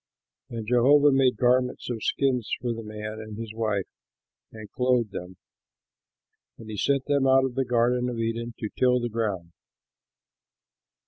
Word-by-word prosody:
And 115 -2 -5
Jehovah 140 +5 +5
made 135 -2 +3
garments 125 0 +1
of 115 -2 -4
skins 125 -3 0
for 120 -2 -2
the 115 - -6
man 105 0 -7
and 110 -1 -8
his 115 -1 -6
wife, 110 -4 -1 0.7
and 110 -1 -10
clothed 125 -4 +1
them. 90 -1 -8 1.2
And 110 -1 -10
he 105 - -6
sent 140 +4 +1
them 140 -2 +2
out 135 0 +5
of 130 - -3
the 135 +1 -1
garden 125 +1 +1
of 120 - -5
Eden 115 +1 -3
to 110 - -4
till 125 -1 +3
the 120 0 -3
ground. 105 -7 -3
120 Hz, 155 wpm, -26 LUFS, 110-125 Hz, 1.2 s, Jehovah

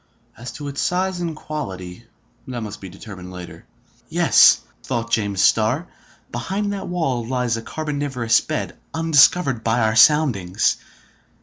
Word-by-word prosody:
As 120 +2 -8
to 145 - -7
its 140 0 -4
size 185 0 0
and 165 -2 -3
quality, 95 -11 -7 0.4
that 125 -2 -5
must 105 -1 -8
be 95 - -8
determined 90 -1 -10
later. 90 -1 -10 0.4
"Yes," - - +6 0.2
thought 115 -2 -3
James 100 -3 +1
Starr, 120 +10 +2 0.4
"behind 205 +1 -2
that 200 - -5
wall 160 -9 -1
lies 125 -1 -1
a 115 - -4
carboniferous 140 -5 0
bed, - - -4 0.2
undiscovered 155 -5 +4
by 115 +2 +1
our 110 0 +1
soundings. 120 - +3
125 Hz, 135 wpm, -21 LUFS, 110-155 Hz, 0.4 s, Yes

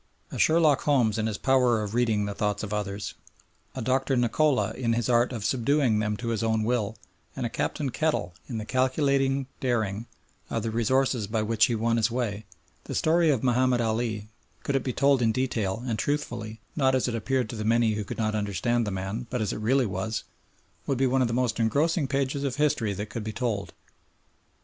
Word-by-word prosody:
A - - -5
Sherlock 155 -3 +4
Holmes 120 -7 +2
in 110 - 0
his 105 -2 -2
power 125 -4 +3
of 105 0 -5
reading 115 -4 +1
the 100 - -3
thoughts 105 0 -1
of 105 -1 -4
others, 100 -1 -3 0.6
a - - -3
Doctor 130 +2 +1
Nikola 120 -3 +2
in 115 -2 -1
his 115 0 -1
art 120 +1 +3
of 115 -5 -4
subduing 130 -1 +2
them 105 -1 -1
to 115 +1 -4
his 115 -1 -1
own 110 -1 +1
will, 110 -2 -1 0.4
and 130 - -3
a - - -1
Captain 135 +3 -2
Kettle 150 - -1 0.2
in 120 - -3
the 110 - -4
calculating 135 +1 +1
daring 110 -3 -1 0.4
of - - -2
the 115 - -2
resources 120 0 +1
by 110 +1 -1
which 110 0 +3
he 120 - 0
won 115 +1 +1
his 115 +1 +2
way, 110 -4 -2 0.4
the - - -5
story 165 +1 +3
of 135 -6 +1
Mahomed 125 0 +3
Ali, 110 -2 -1 0.4
could 140 - -1
it 135 - +1
be 130 - -1
told 140 +1 +3
in 115 -2 +3
detail 115 -4 -1
and 115 -4 -2
truthfully, 120 -6 -3
not 130 -3 +3
as 130 - +1
it 120 - -2
appeared 125 +2 0
to - - -6
the 110 - -4
many 115 0 +3
who 105 0 -2
could - - -7
not 110 -1 0
understand 105 +3 0
the - - -1
man, 95 +6 -4
but 125 - -2
as 110 -3 -1
it - - -5
really 125 +4 +2
was, 105 +2 -3 0.6
would 135 - 0
be 135 - +2
one 130 +1 +2
of 125 - +3
the - - -3
most 120 -2 0
engrossing 145 +7 +2
pages 140 0 -1
of 135 -3 -1
history 140 -8 +1
that 105 +2 -5
could 115 - -4
be 110 - -4
told. 105 -3 -2
115 Hz, 210 wpm, -27 LUFS, 110-130 Hz, 0.6 s, Sherlock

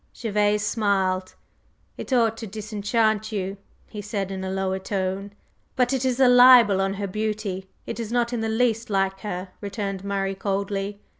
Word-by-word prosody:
Gervase 210 -2 +1
smiled. 190 -4 0 0.6
"It - - -8
ought 230 -3 +3
to 225 - -6
disenchant 215 +1 -1
you," 195 -1 -3 0.3
he 210 - -7
said 200 -2 -3
in 190 -1 -4
a 190 - -3
lower 190 0 -1
tone. 190 +1 -3 0.4
"But 250 0 +2
it 265 -1 0
is 255 0 0
a 260 - +6
libel 245 -5 +7
on 195 0 0
her 200 0 -3
beauty, 205 -2 -3 0.2
it - - -5
is 225 -1 -4
not 240 0 0
in 235 - -1
the 225 - -1
least 225 0 0
like 195 -1 0
her," 185 -2 -5
returned 200 -2 -4
Murray 195 -1 -1
coldly. 200 +1 -3
205 Hz, 170 wpm, -24 LUFS, 195-225 Hz, 0.6 s, libel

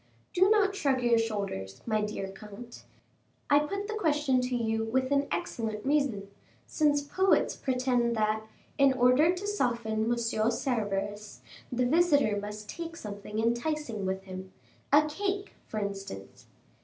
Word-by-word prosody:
Do 375 +2 +5
not 415 -2 +4
shrug 270 -8 +1
your 235 -1 +4
shoulders, 200 - -3
my 215 -2 +1
dear 210 -2 -3
comte: 210 +4 -11 0.7
I 285 - +7
put 395 +7 -3
the 440 - -3
question 295 -10 +2
to 250 0 -1
you 225 -2 0
with 260 +4 0
an 280 0 +2
excellent 225 -10 -3
reason, 275 -9 +1 0.4
since 290 -2 +2
poets 380 +7 +2
pretend 250 -2 +1
that, 215 0 +1 0.4
in 275 -1 +6
order 255 +6 +5
to 365 +2 -4
soften 235 - 0
Monsieur 230 -2 +1
Cerberus, 205 -4 -2 0.3
the 250 0 +1
visitor 285 -7 +3
must 210 0 -7
take 335 +4 -6
something 210 -3 -7
enticing 235 -1 -1
with 190 0 -2
him 185 0 -8 0.4
a 295 +2 +6
cake, 395 +5 -3
for 215 - -6
instance. 195 - -6
240 Hz, 145 wpm, -29 LUFS, 210-295 Hz, 0.7 s, I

